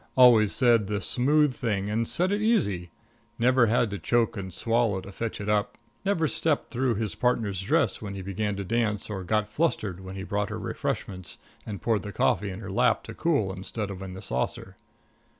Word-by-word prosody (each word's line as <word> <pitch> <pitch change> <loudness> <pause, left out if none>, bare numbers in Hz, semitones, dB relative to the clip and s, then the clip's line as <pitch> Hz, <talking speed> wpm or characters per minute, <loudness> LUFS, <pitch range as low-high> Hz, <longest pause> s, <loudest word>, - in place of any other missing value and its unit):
Always 115 -5 +7
said 120 -5 +4
the 105 0 -1
smooth 140 - +2
thing 105 -5 -1
and 110 +2 0
said 180 +2 +1
it 205 +1 0
easy. 105 - +1 0.5
Never 125 0 +4
had 115 -1 +2
to 100 - -4
choke 120 +7 +1
and 95 -2 -5
swallow 115 0 +1
to 95 +1 -9
fetch 115 +3 -4
it 100 - -5
up. 105 -1 0 0.3
Never 195 -5 +1
stepped 155 0 0
through 125 -1 +1
his 110 -1 -2
partner's 110 -6 0
dress 95 - +1
when 100 -2 -5
he 95 - -6
began 100 +2 -2
to 100 - -4
dance, 105 0 -1
or 95 -2 -4
got 105 +3 +1
flustered 105 - -1
when 95 0 -8
he 95 - -5
brought 105 0 -1
her - - -4
refreshments 95 -3 -4 0.3
and 100 -3 -6
poured 110 -3 +2
the 100 - -6
coffee 100 +1 +1
in 95 +2 -7
her 95 - -6
lap 95 - +2
to - - -8
cool 140 - +1
instead 100 +2 -5
of 95 -1 -7
in 95 -1 -7
the 95 - -8
saucer. 65 -7 -3
105 Hz, 205 wpm, -27 LUFS, 95-120 Hz, 0.5 s, Always